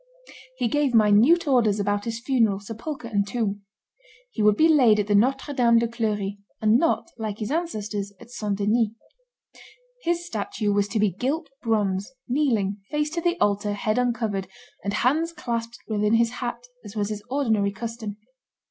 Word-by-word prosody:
He 250 Hz, -2 st, 0 dB
gave 280 Hz, 0 st, +1 dB
minute 225 Hz, +11 st, +5 dB
orders 225 Hz, -6 st, +3 dB
about 205 Hz, 0 st, 0 dB
his 230 Hz, 0 st, -3 dB
funeral, 230 Hz, -6 st, +2 dB
sepulchre, 230 Hz, +6 st, -6 dB
and 205 Hz, -3 st, 0 dB
tomb. 205 Hz, -2 st, -2 dB, 0.7 s
He -, -, -3 dB
would 210 Hz, 0 st, +4 dB
be 320 Hz, -, +6 dB
laid 250 Hz, -9 st, +5 dB
at 205 Hz, 0 st, +1 dB
Notre 270 Hz, +6 st, +2 dB
Dame 235 Hz, -3 st, +4 dB
de 230 Hz, 0 st, +2 dB
Clery, 210 Hz, -4 st, -2 dB, 0.2 s
and 220 Hz, +2 st, +4 dB
not, 335 Hz, +1 st, 0 dB
like 215 Hz, -2 st, -3 dB
his 220 Hz, +3 st, -4 dB
ancestors, 215 Hz, -, -2 dB
at 240 Hz, 0 st, -14 dB
St. 210 Hz, -4 st, -2 dB
Denis; 215 Hz, +3 st, +2 dB, 1.1 s
his 345 Hz, -2 st, -1 dB
statue 210 Hz, -2 st, -2 dB
was 200 Hz, 0 st, +2 dB
to 210 Hz, +2 st, -2 dB
be 210 Hz, -2 st, +3 dB
gilt 275 Hz, -, -2 dB
bronze, 205 Hz, -2 st, 0 dB, 0.2 s
kneeling, 235 Hz, -8 st, +1 dB
face 300 Hz, 0 st, -1 dB
to 335 Hz, +1 st, -2 dB
the 345 Hz, +1 st, 0 dB
altar, 205 Hz, 0 st, +1 dB
head 215 Hz, +3 st, 0 dB
uncovered, 220 Hz, -6 st, -1 dB, 0.4 s
and 200 Hz, -, -1 dB
hands 295 Hz, +10 st, +1 dB
clasped 235 Hz, -6 st, -4 dB
within 210 Hz, 0 st, +2 dB
his 230 Hz, 0 st, +3 dB
hat, 240 Hz, -1 st, -5 dB, 0.2 s
as 205 Hz, -1 st, -10 dB
was 205 Hz, -1 st, -1 dB
his 210 Hz, -1 st, -4 dB
ordinary 220 Hz, -7 st, +1 dB
custom. 220 Hz, 0 st, -6 dB
225 Hz, 165 wpm, -25 LUFS, 205-255 Hz, 1.1 s, be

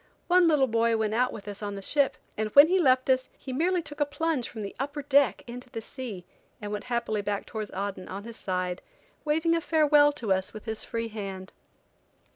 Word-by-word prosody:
One 360 Hz, -1 st, +5 dB
little 300 Hz, -4 st, +4 dB
boy 230 Hz, -1 st, +2 dB
went 215 Hz, -1 st, 0 dB
out 250 Hz, +2 st, +2 dB
with 205 Hz, -1 st, -9 dB
us 205 Hz, 0 st, -7 dB
on 205 Hz, -1 st, -4 dB
the 195 Hz, -, -6 dB
ship, 280 Hz, +5 st, +2 dB, 0.2 s
and 215 Hz, 0 st, -2 dB
when 285 Hz, +3 st, +9 dB
he 375 Hz, +1 st, +3 dB
left 260 Hz, -5 st, +3 dB
us 260 Hz, -1 st, +2 dB
he 260 Hz, -, -7 dB
merely 345 Hz, +5 st, +1 dB
took 295 Hz, -1 st, -10 dB
a 290 Hz, -, +3 dB
plunge 305 Hz, -3 st, -1 dB
from 220 Hz, -3 st, -7 dB
the 200 Hz, -, -7 dB
upper 290 Hz, +2 st, -3 dB
deck 280 Hz, -1 st, +3 dB
into 245 Hz, +1 st, -9 dB
the 235 Hz, -2 st, -5 dB
sea 225 Hz, -6 st, -7 dB, 0.3 s
and 205 Hz, -1 st, -6 dB
went 210 Hz, -1 st, -4 dB
happily 235 Hz, -3 st, -1 dB
back 205 Hz, 0 st, -3 dB
towards 215 Hz, -3 st, -5 dB
Aden, 195 Hz, -1 st, -5 dB
on 195 Hz, +2 st, -6 dB
his 230 Hz, 0 st, -8 dB
side, 180 Hz, -1 st, -2 dB, 0.4 s
waving 320 Hz, +2 st, +2 dB
a 335 Hz, -, 0 dB
farewell 300 Hz, -2 st, +4 dB
to 230 Hz, -9 st, 0 dB
us 190 Hz, 0 st, -2 dB
with 215 Hz, -, -9 dB
his 220 Hz, -1 st, -3 dB
free 230 Hz, 0 st, -3 dB
hand. 195 Hz, -3 st, -7 dB
235 Hz, 220 wpm, -27 LUFS, 205-290 Hz, 0.4 s, when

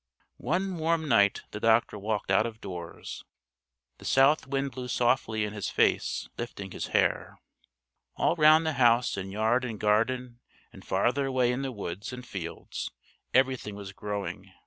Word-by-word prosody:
One 185 Hz, +2 st, -1 dB
warm 160 Hz, 0 st, +1 dB
night 100 Hz, -6 st, +3 dB
the 105 Hz, -, -5 dB
doctor 115 Hz, 0 st, +3 dB
walked 105 Hz, -1 st, -2 dB
out 110 Hz, +4 st, +4 dB
of 110 Hz, -1 st, -9 dB
doors. 85 Hz, -4 st, -7 dB, 0.8 s
The -, -, -12 dB
south 135 Hz, +3 st, +4 dB
wind 135 Hz, 0 st, -1 dB
blew 125 Hz, 0 st, -6 dB
softly 120 Hz, -3 st, +1 dB
in 105 Hz, -, -5 dB
his 105 Hz, -3 st, -3 dB
face, -, -, +1 dB
lifting 100 Hz, -5 st, -6 dB
his -, -, -4 dB
hair. -, -, +1 dB, 0.8 s
All -, -, +2 dB
round 155 Hz, 0 st, +6 dB
the 160 Hz, -, 0 dB
house 120 Hz, 0 st, +4 dB
in 95 Hz, 0 st, -5 dB
yard 110 Hz, +5 st, +1 dB
and 115 Hz, -4 st, -4 dB
garden 120 Hz, +3 st, +1 dB, 0.3 s
and -, -, -13 dB
farther 125 Hz, +8 st, +1 dB
away 130 Hz, -2 st, +2 dB
in 125 Hz, +2 st, -2 dB
the 135 Hz, -1 st, -3 dB
woods 100 Hz, 0 st, -6 dB
and 125 Hz, 0 st, -8 dB
fields 85 Hz, -7 st, -6 dB, 0.4 s
everything 130 Hz, -5 st, +1 dB
was 100 Hz, -1 st, -8 dB
growing. 100 Hz, 0 st, -5 dB
120 Hz, 160 wpm, -28 LUFS, 105-130 Hz, 0.8 s, round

